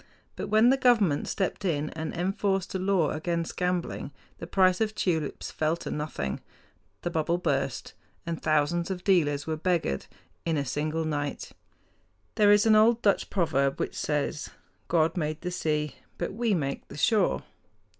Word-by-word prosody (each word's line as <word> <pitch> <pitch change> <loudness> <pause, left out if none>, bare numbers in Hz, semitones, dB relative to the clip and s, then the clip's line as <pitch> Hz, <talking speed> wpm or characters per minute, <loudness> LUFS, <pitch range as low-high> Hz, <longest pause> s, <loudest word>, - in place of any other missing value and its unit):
But - - -4
when 220 +4 +5
the 270 - +3
government 225 - +3
stepped 195 +1 -2
in 155 -5 -1
and 160 0 -4
enforced 195 +1 -1
a 190 - -1
law 185 -5 +2
against 170 +1 -2
gambling 180 -5 -2 0.3
the 165 - -6
price 185 +1 +3
of 215 -1 0
tulips 160 -6 -1
fell 155 +2 0
to - - -6
nothing. 150 - -3 0.6
The 175 - -2
bubble 165 +1 +1
burst, 180 - -2 0.3
and 170 -2 -4
thousands 155 +3 +1
of 180 -2 -4
dealers 145 -7 +2
were 160 -1 -2
beggared 165 - 0 0.4
in 165 -2 0
a 140 - -1
single 155 +4 -1
night. 145 -2 -3 0.8
There 205 -1 +5
is 205 +1 +5
an 220 -1 +6
old 225 +2 +4
Dutch 200 -2 +2
proverb 140 -7 +1
which - - -2
says, 150 0 -2 0.4
"God 165 -1 +2
made 155 -1 -2
the 180 - -3
sea; 150 -4 -1 0.2
but - - -3
we 225 -1 +1
make 140 -4 -3
the - - -10
shore." 215 +7 +2
170 Hz, 165 wpm, -28 LUFS, 155-195 Hz, 0.8 s, an